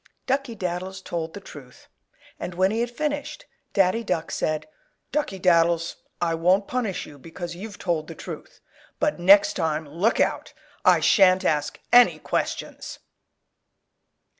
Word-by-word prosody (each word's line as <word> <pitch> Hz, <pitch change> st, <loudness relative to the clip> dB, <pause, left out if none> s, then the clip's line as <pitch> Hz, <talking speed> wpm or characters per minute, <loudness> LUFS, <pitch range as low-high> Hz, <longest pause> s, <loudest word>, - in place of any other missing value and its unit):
Duckey 270 Hz, -3 st, -1 dB
Daddles 185 Hz, +1 st, -4 dB
told 165 Hz, -2 st, -5 dB
the -, -, -6 dB
truth, 140 Hz, -9 st, -14 dB, 0.5 s
and 175 Hz, 0 st, -5 dB
when 185 Hz, +2 st, +2 dB
he 225 Hz, -, -1 dB
had 240 Hz, +1 st, 0 dB
finished, 295 Hz, -, -4 dB, 0.3 s
Daddy 195 Hz, +3 st, +2 dB
Duck 165 Hz, -6 st, -2 dB
said, 155 Hz, 0 st, -2 dB, 0.4 s
"Duckey 280 Hz, -10 st, -2 dB
Daddles, 170 Hz, -2 st, +2 dB, 0.2 s
I 170 Hz, -1 st, 0 dB
won't 180 Hz, +5 st, +2 dB
punish 235 Hz, -7 st, -2 dB
you 145 Hz, -, -13 dB
because 170 Hz, +4 st, -7 dB
you've 205 Hz, +3 st, -8 dB
told 165 Hz, -4 st, -2 dB
the -, -, -8 dB
truth. -, -, -9 dB, 0.4 s
But 300 Hz, -10 st, 0 dB
next 195 Hz, +3 st, +6 dB
time 160 Hz, -3 st, -2 dB
look 175 Hz, +10 st, 0 dB
out! -, -, 0 dB, 0.3 s
I -, -, +5 dB
shan't 190 Hz, -2 st, +5 dB
ask 150 Hz, -1 st, 0 dB
any 245 Hz, 0 st, +7 dB
questions." -, -, -4 dB
185 Hz, 140 wpm, -24 LUFS, 165-220 Hz, 0.5 s, any